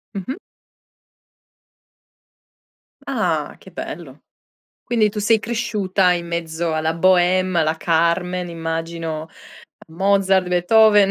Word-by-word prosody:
Mh-mh. 200 +8 -5 2.7
Ah, - - -1
che - - -16
bello. - - -8 0.6
Quindi 225 -3 +1
tu 210 +1 -5
sei 220 +2 +3
cresciuta 210 -5 0
in 170 -1 -3
mezzo 170 -1 -3
alla 160 +1 0
Boheme, 185 +1 +3
alla 155 0 +1
Carmen, 175 +2 0
immagino 165 -1 -4 0.4
a 160 - -22
Mozart, 190 0 +2
Beethoven, 205 +3 +4
180 Hz, 95 wpm, -20 LUFS, 165-200 Hz, 2.7 s, Beethoven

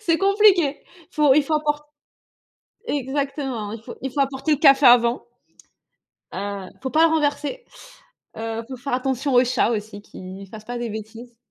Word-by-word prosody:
c'est 335 -6 +1
compliqué. 390 -6 +3 0.3
Faut, 300 -5 +4
il 300 - +4
faut 310 +3 -2
apport 295 -1 -2 0.9
exactement, 275 - -3
il 225 0 -8
faut, - - -10
il 265 -1 -5
faut 285 - -1
apporter 275 +3 0
le 295 - +2
café 275 -2 +6
avant 240 0 +4 1.0
heu, 200 -1 -5
faut 260 - -3
pas 320 +3 +5
le 320 - 0
renverser. 295 +9 -1 0.7
Heu, 225 0 -4
faut 260 - -7
faire 275 +1 -5
attention 265 +1 -1
aux 245 0 +6
chats 245 -2 +1
aussi 210 -2 -5
qu'ils 190 0 -10
fassent 215 +1 -11
pas 245 +1 -5
des 240 -1 -4
bêtises. 225 +3 -9
265 Hz, 165 wpm, -22 LUFS, 230-295 Hz, 1.0 s, café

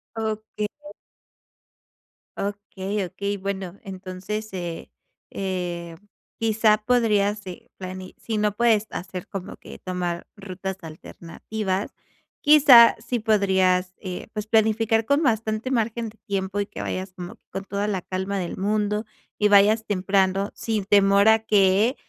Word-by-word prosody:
Okey. 215 -1 -3 1.7
Okey, 200 0 -3
okey, 200 +3 -3
bueno 195 -1 -5
entonces, 195 +2 -6
eh 175 -3 -5 0.4
eh, 175 -3 -4 0.4
quizá 220 -1 +3
podrías, 210 -3 +1
eh, 180 -2 -9
plani 185 0 -8
si 220 -2 -3
no 210 -1 +1
puedes 220 -2 +3
hacer 180 0 -6
como 195 -2 -6
que - - -12
tomar 175 -2 -3
rutas 190 -1 -6
alternativas, 185 +5 -5 0.5
quizá 280 -6 +8
si 245 0 -1
podrías, 190 -4 +2
eh, 185 -3 -6
pues, 210 -1 -4
planificar 220 0 +2
con 285 +6 +2
bastante 220 -1 0
margen 230 -1 -1
de 215 - -19
tiempo 195 -1 -2
y 205 - 0
que 210 - -7
vayas 185 0 -4
como 180 -1 -8
que - - -43
con 195 - -5
toda 200 +1 -2
la 195 -3 -1
calma 190 +2 -3
del 175 -2 -4
mundo, 210 +2 0 0.3
y 210 - +3
vayas 210 +2 +5
temprano 195 0 +1
sin 220 -3 -2
temor 200 0 +5
a 220 0 +6
que, 210 +2 +3
200 Hz, 135 wpm, -24 LUFS, 190-220 Hz, 1.7 s, quizá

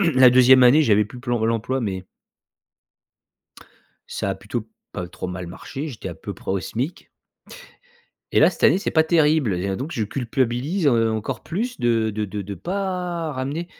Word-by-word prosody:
La 130 -1 +8
2e 130 +1 +6
année, 140 +6 +6
j'avais 105 -5 +3
plus 120 +4 -11
p 120 0 -8
Pôle 115 -1 +1
emploi, 120 +4 -2
mais 95 -4 -3 2.0
Ça 100 - -3
a - - -1
plutôt 105 +4 -5 0.3
pas 90 - -4
trop 90 - -6
mal 90 0 -6
marché, 135 - -7
j'étais 125 -7 -7
à - - -7
peu - - -8
près - - -7
au 95 0 0
SMIC. 130 - -4 1.2
Et - - +3
là - - +7
cette - - -7
année - - +5
c'est 200 - -3
pas 160 - +5
terrible 155 - +2
et 90 +3 -2
à 95 - -1
donc 135 - -5
je 115 -9 -1
culpabilise, 130 - -1
heu, 115 -4 +3
encore 110 +3 -3
plus 235 +8 -4
de 115 -2 +2
de 105 0 -3
de 105 0 -5
de 100 +1 -6
pas 180 - -3
ramener 140 +6 -3
125 Hz, 185 wpm, -22 LUFS, 105-155 Hz, 2.0 s, La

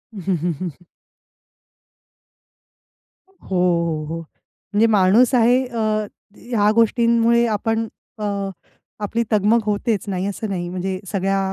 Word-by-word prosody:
हं, 190 -2 -1
हं, 170 +2 -1
हं. 180 -2 -3 2.6
हो, 385 - -30
हो, 170 -4 +1
हो. 165 +2 -5 0.5
म्हणजे 210 +2 +4
माणूस 215 +5 +4
आहे 245 +2 +4
अ, 240 -2 -5 0.6
ह्या 215 -4 +1
गोष्टींमुळे 235 0 +3
आपण 225 +1 -1 0.3
अ, - - -4 0.8
आपली 230 +3 -1
तगमग 215 +2 +4
होतेच 210 0 0
नाही 190 -1 -2
असं 205 +2 -4
नाही 175 -3 -3
म्हणजे 185 +1 -3
सगळ्या 195 0 0
205 Hz, 115 wpm, -21 LUFS, 185-230 Hz, 2.6 s, म्हणजे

